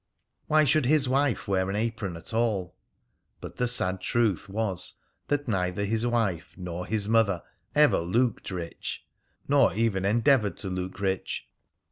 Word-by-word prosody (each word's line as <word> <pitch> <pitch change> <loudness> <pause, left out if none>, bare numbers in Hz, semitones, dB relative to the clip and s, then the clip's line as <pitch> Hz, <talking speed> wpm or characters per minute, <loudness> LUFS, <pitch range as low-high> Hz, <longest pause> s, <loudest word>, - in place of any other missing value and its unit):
Why 155 0 +4
should 150 -2 +2
his 145 -1 +3
wife 135 -2 +1
wear 95 -1 +1
an 100 - -2
apron 105 -5 -2
at 85 - -6
all? 110 -6 0 0.6
But - - -9
the 125 - +1
sad 95 -6 +2
truth 110 -2 0
was 100 -3 -1 0.3
that 145 -1 -1
neither 95 -2 -1
his 110 +3 +1
wife 110 -8 -1
nor 90 -1 -5
his 105 -1 0
mother 105 -6 +2 0.3
ever 150 0 +5
looked 115 +8 0
rich, 90 -3 -6 0.4
nor - - +4
even 110 -4 +1
endeavoured 110 - +3
to 100 - -3
look 90 +1 -4
rich. 95 -1 -2
105 Hz, 150 wpm, -27 LUFS, 95-120 Hz, 0.6 s, ever